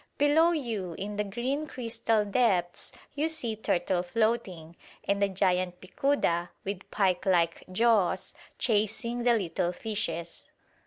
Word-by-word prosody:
Below 310 +4 +5
you 225 - -2
in 205 +1 -5
the 210 - +1
green 255 +9 -2
crystal 230 -4 0
depths 195 -5 +1 0.2
you 295 +2 0
see 255 -9 -1
turtle 180 -3 0
floating, 185 -5 -1 0.3
and 200 0 0
the 200 - +3
giant 185 -2 +1
picuda, 185 -5 0 0.2
with 195 -1 -5
pike 185 -3 +1
like 170 -3 +2
jaws, 220 -2 +2 0.2
chasing 225 +2 0
the 240 0 +4
little 175 -4 -1
fishes. 170 -4 -3
205 Hz, 125 wpm, -29 LUFS, 180-235 Hz, 0.3 s, Below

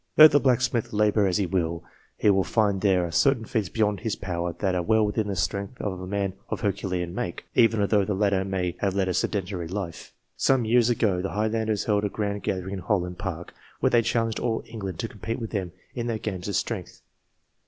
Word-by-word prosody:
Let 155 0 +11
the 145 - +5
blacksmith 125 -4 +1
labour 105 -1 +3
as 90 - +1
he 100 - +1
will, 85 -2 -1 0.3
he 105 - +4
will 95 -1 +3
find 100 -3 +1
there 95 -4 +3
are 85 - -5
certain 120 - +3
feats 105 -5 -1
beyond 105 -2 +1
his 110 -2 -2
power 85 -3 -3
that 95 +2 -1
are 90 - +1
well 110 +4 +3
within 105 0 -1
the 100 - -2
strength 100 +6 -2
of 95 -3 -3
a 95 - -6
man 100 -1 -1 0.2
of - - -3
herculean 90 -4 -2
make, 90 -2 -4
even 115 -2 +4
although 100 0 +3
the 95 +1 -1
latter 100 -1 +2
may 95 -2 -2
have 100 -2 0
led 95 -1 +1
a - - 0
sedentary 90 -3 -2
life. 90 -2 -5 0.2
Some 130 -3 +2
years 120 +1 +4
ago, 105 -6 +1
the 95 - -4
Highlanders 110 0 0
held 105 -1 +1
a 105 - 0
grand 100 0 -3
gathering 95 0 -3
in 95 - -3
Holland 90 -3 -1
Park, 85 +1 -5 0.3
where - - +2
they 120 - +5
challenged 115 -1 0
all 115 -2 -1
England 100 -6 -6
to 115 - -2
compete 115 +2 -5
with 115 -2 -5
them 95 -5 -2 0.2
in 120 -1 -3
their 115 -2 -1
games 100 -4 -4
of 100 - -2
strength. - - -3
100 Hz, 220 wpm, -26 LUFS, 95-110 Hz, 0.3 s, Let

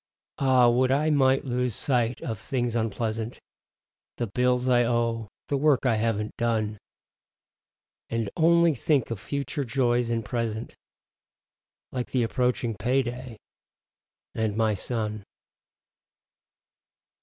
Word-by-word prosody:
Ah, 130 -3 +5
would 125 +2 +3
I 150 +3 +2
might 135 -2 +3
lose 125 -3 -1
sight 120 -3 0
of 110 -4 -4
things 120 +2 -2
unpleasant: 110 +1 -2 0.8
The 120 - -1
bills 125 +3 +1
I 120 -1 +4
owe; 115 -2 0 0.2
the 140 - 0
work 140 -2 +3
I 115 -3 +3
haven't 110 -1 -1
done. 110 -3 -1 1.3
And 115 -2 -1
only 170 0 +4
think 135 -1 +1
of 115 - -3
future 140 +4 -3
joys 120 -1 +1
and 115 -2 -1
present, 115 0 -3 1.2
Like 125 -2 -3
the 125 -2 +1
approaching 125 -1 0
payday, 125 -1 -1 1.0
and 110 -2 -1
my 110 -1 +2
son. 105 0 -3
120 Hz, 115 wpm, -26 LUFS, 115-130 Hz, 1.3 s, Ah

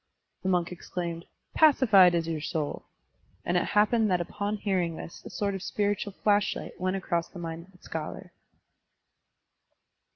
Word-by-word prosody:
The 190 - -1
monk 180 -2 +1
exclaimed, 170 -1 -5 0.3
"Pacified 220 - +6
is 165 -1 0
your 160 -2 -2
soul!" 155 -1 -3 0.6
and 175 - 0
it 175 - +2
happened 215 +1 +3
that 180 -1 +2
upon 205 +4 -3
hearing 185 -5 0
this 165 - -9
a - - -8
sort 200 -1 -2
of 195 - -4
spiritual 205 0 -1
flashlight 205 0 +1
went 185 +1 0
across 175 -3 -1
the - - -11
mind 165 0 -6
of - - -22
the 180 - -22
scholar. 155 -1 -6
185 Hz, 155 wpm, -28 LUFS, 170-205 Hz, 0.6 s, Pacified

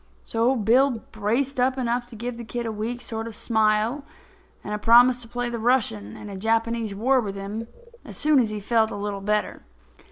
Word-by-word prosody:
So 235 +3 +1
Bill 240 +2 +2
braced 240 +6 -1
up 260 +1 +2
enough 240 -1 -1
to 240 - -11
give 240 +2 -5
the 235 - -7
kid 235 +1 -4
a 225 - -2
weak 225 +3 -4
sort 225 0 -5
of 230 - -7
a - - -6
smile 220 +5 +1 0.6
and 210 - -5
a 210 - -2
promise 245 +3 +6
to 230 - -9
play 245 +1 -3
the 235 -1 -4
Russian 215 - 0
in - - -9
a 200 - -7
Japanese 225 +1 0
war 255 +5 +3
with 200 -3 -5
him 205 +3 -5 0.4
is - - -10
soon 300 -2 +4
as 230 -4 +2
he 215 0 -4
felt 220 +1 +2
a - - -6
little 205 -1 -4
better. 210 +1 -1
230 Hz, 215 wpm, -24 LUFS, 210-245 Hz, 0.6 s, promise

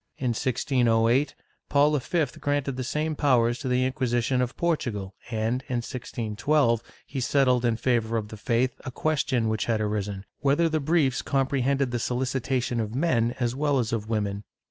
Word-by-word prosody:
^ - - -52
In 130 - -1
1608, 120 +1 +2 0.3
Paul 145 +1 +4
V 155 +4 +1
granted 145 -2 -1
the 130 - -3
same 150 +4 -1
powers 120 -4 +2
to 130 - -4
the 125 0 +2
In(|uisition 130 -1 0
of 125 0 -2
Portugal 115 - -1 0.2
and, 115 +2 -1
in 125 - -1
1612, 115 +1 0 0.2
he 135 - -5
settled 125 -1 +2
in 120 -2 +2
favor 115 -2 +1
of 105 -2 -4
the 110 - -8
faith 120 +3 0
a 130 - -4
question 130 -4 0
which 110 0 0
had 115 -2 +1
arisen, 105 -2 -2
whether 145 +4 +3
the 160 -1 0
briefs 145 -3 +2
comprehended 135 -1 +1
the 120 - -1
solicitation 125 0 -1
of 110 0 -3
men 125 -6 +1
as 120 -2 0
well 145 +1 +1
as 115 -3 -1
of 110 -1 -3
women. 105 -2 -1
125 Hz, 170 wpm, -26 LUFS, 115-140 Hz, 0.3 s, Paul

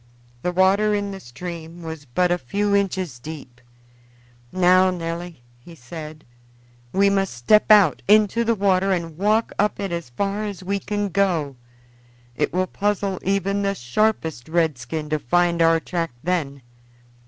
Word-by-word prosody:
The 180 - -1
water 195 +4 +3
in 205 -1 -2
the 195 - -7
stream 170 +4 -8
was 160 -2 -7
but 175 +8 +1
a 175 - +1
few 200 +9 0
inches 185 -9 -1
deep. 130 -4 -10 0.9
"Now, 185 0 +4
Nelly," 170 -4 -5 0.2
he 165 +8 -14
said, 155 +3 -9 0.7
"we 200 +1 +3
must 195 -7 0
step 165 - +3
out 205 -8 +6
into 215 +2 +4
the 230 0 +1
water 195 -1 +2
and 170 -4 -2
walk 215 +5 +1
up 210 +1 +1
it 195 -3 -3
as 170 -6 -4
far 200 - -2
as 200 -3 -6
we 200 +2 -1
can 205 0 -2
go 170 -8 0 0.8
it - - 0
will 185 +2 +1
puzzle 200 -1 -1
even 195 +1 0
the 200 0 0
sharpest 160 - -1
redskin 155 -3 -1
to 155 - +1
find 170 +5 +1
our 165 0 +4
track 165 0 -3
then." 150 -6 -2
180 Hz, 155 wpm, -22 LUFS, 160-200 Hz, 0.9 s, out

